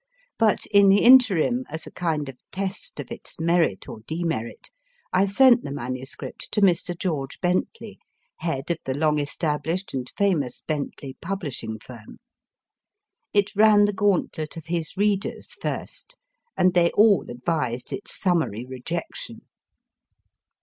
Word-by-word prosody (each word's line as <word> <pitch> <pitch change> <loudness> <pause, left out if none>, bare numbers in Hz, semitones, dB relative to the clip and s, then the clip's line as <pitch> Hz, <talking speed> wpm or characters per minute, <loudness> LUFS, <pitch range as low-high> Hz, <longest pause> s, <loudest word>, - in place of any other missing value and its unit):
But 220 -2 +3
in 200 -1 +7
the 200 +1 +5
interim, 245 -2 +6
as 160 - -6
a - - -10
kind 160 -5 -2
of 135 - -7 0.2
test 195 +1 -4
of - - -7
its - - -9
merit 165 - +1
or - - -8
demerit, 160 -8 -3 0.4
I 195 - +4
sent 245 +4 +5
the 140 - -5
MS. 130 -1 -5 0.3
to 210 - 0
Mr. 175 -2 +2
George 150 -7 -3
Bentley, 180 - -2 0.4
head 160 -2 -3
of 170 - -2
the 130 - -2
long 150 0 +2
established 155 +5 -2
and 130 -2 -4
famous 165 -11 0
Bentley 140 -3 -5
publishing 165 - -4
firm. 110 0 -12 1.1
It 205 0 +1
ran 210 0 +6
the 205 - 0
gauntlet 190 -6 0
of 160 - -8
his 165 +1 -3
readers 205 0 -1
first, - - -6 0.4
and 185 -1 +4
they 175 -1 +4
all 210 -2 +4
advised 125 -1 -2
its 200 - -5
summary 160 - 0
rejection. 165 - -5
170 Hz, 135 wpm, -24 LUFS, 140-200 Hz, 1.1 s, in